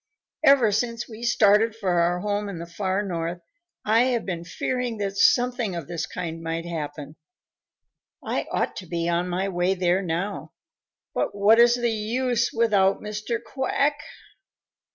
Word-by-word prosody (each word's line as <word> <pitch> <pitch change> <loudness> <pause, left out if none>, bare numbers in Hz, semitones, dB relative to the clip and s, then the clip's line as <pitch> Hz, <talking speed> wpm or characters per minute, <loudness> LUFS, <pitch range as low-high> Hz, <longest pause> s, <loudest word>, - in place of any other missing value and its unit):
Ever 275 -7 +6
since 230 +2 -1
we 225 -1 -11
started 220 -1 +3
for 185 -6 0
our 175 +1 +1
home 205 0 -2
in 195 - -6
the 170 - -6
far 190 +3 -2
North, 170 -2 -3 0.5
I 225 +3 +4
have 245 -3 0
been 175 -3 -4
fearing 245 +7 -3
that 200 -1 -3
something 245 -2 +2
of 165 -5 -5
this 165 -2 -4
kind 165 -2 -5
might 165 +1 -3
happen. 150 -3 -6 1.1
I - - -2
ought - - -1
to 185 - -7
be 170 0 -2
on 175 +1 0
my 185 +2 -1
way 185 0 0
there 180 0 +1
now, 180 +3 -3 0.6
but - - -1
what 210 +3 +5
is 240 0 +6
the 240 -1 0
use 235 +3 0
without 205 -4 +2
Mr. 215 +2 -3
Quack? 275 +4 0
200 Hz, 155 wpm, -24 LUFS, 175-230 Hz, 1.1 s, Ever